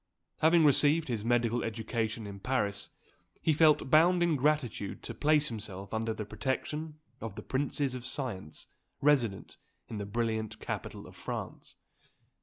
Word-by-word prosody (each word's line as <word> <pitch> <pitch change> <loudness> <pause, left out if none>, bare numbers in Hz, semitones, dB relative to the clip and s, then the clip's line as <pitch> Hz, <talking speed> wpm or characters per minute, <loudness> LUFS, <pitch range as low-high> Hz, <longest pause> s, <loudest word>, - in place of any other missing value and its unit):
Having 165 0 +5
received 150 +2 +4
his 115 -4 -2
medical 120 0 +2
education 115 0 -2
in 100 -1 -7
Paris, 105 -4 -1 0.5
he 160 - +2
felt 150 -3 +4
bound 175 +3 +6
in 170 -2 +3
gratitude 135 -8 0
to - - -5
place 150 0 +3
himself 100 -3 -7
under 110 0 0
the 110 -1 -4
protection 150 +7 -3 0.2
of 110 -3 -6
"the - - -7
princes 140 0 -1
of 125 -2 -5
science," 115 - -4 0.3
resident 130 -8 +1 0.3
in 110 - -4
the 100 - -4
brilliant 110 0 -2
capital - - -5
of - - -13
France. - - -6
120 Hz, 145 wpm, -31 LUFS, 110-150 Hz, 0.5 s, bound